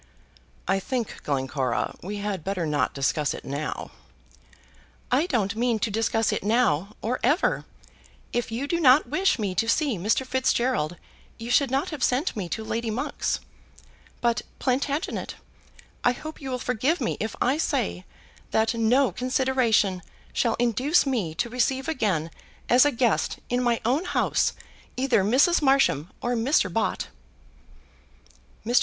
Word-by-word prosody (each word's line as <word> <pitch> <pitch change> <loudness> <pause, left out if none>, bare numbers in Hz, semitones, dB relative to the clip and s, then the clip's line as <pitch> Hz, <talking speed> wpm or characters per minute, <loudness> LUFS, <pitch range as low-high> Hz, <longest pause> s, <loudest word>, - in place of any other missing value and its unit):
"I 195 0 +2
think, 245 +2 -4
Glencora, 130 -3 -1
we 205 +3 -5
had 200 -4 -3
better 190 -2 -2
not 150 -3 0
discuss 140 +2 0
it - - -10
now." 140 +3 -4 1.2
"I 280 +7 +3
don't 220 - 0
mean 235 0 +1
to 215 +1 -1
discuss 225 +1 +1
it - - -2
now, 210 -4 +1
or 245 +3 -1
ever. 320 +6 +2 0.7
If 240 -1 -1
you 240 +5 -2
did 340 +3 0
not 265 -1 +6
wish 370 +5 +2
me 205 -5 -2
to 225 +5 0
see 275 - +1
Mr. 220 +8 +1
Fitzgerald 250 -10 0 0.4
you 230 +1 -5
should 275 +1 +4
not 270 +3 0
have 295 -5 -4
sent 265 +7 +1
me 190 -5 -4
to 220 - -3
Lady 230 +1 -2
Monk's. 225 +4 -2 0.8
But, 235 0 +1 0.2
Plantagenet, 280 +5 -1 0.7
I 245 - +4
hope 310 +5 -9
you 270 - -5
will 255 - -1
forgive 250 - 0
me 235 - -1
if 220 - -3
I 270 +5 +1
say 90 - -1 0.5
that 220 +1 +2
no 240 +4 +3
consideration 250 -7 +1 0.3
shall 230 -2 +1
induce 250 +8 +2
me 215 - -1
to 200 - -1
receive 255 +2 0
again 195 - 0 0.4
as 250 +3 +6
a 290 - +3
guest, 235 -3 +1
in 245 0 +2
my 240 -2 +1
own 275 +10 +1
house, - - +1 0.4
either 255 -6 +2
Mrs. 270 - +4
Marsham 270 - +3
or 245 - 0
Mr. 225 - +2
Bott." 225 - -1 1.6
Mr. 240 +2 +4
235 Hz, 150 wpm, -25 LUFS, 205-265 Hz, 1.6 s, not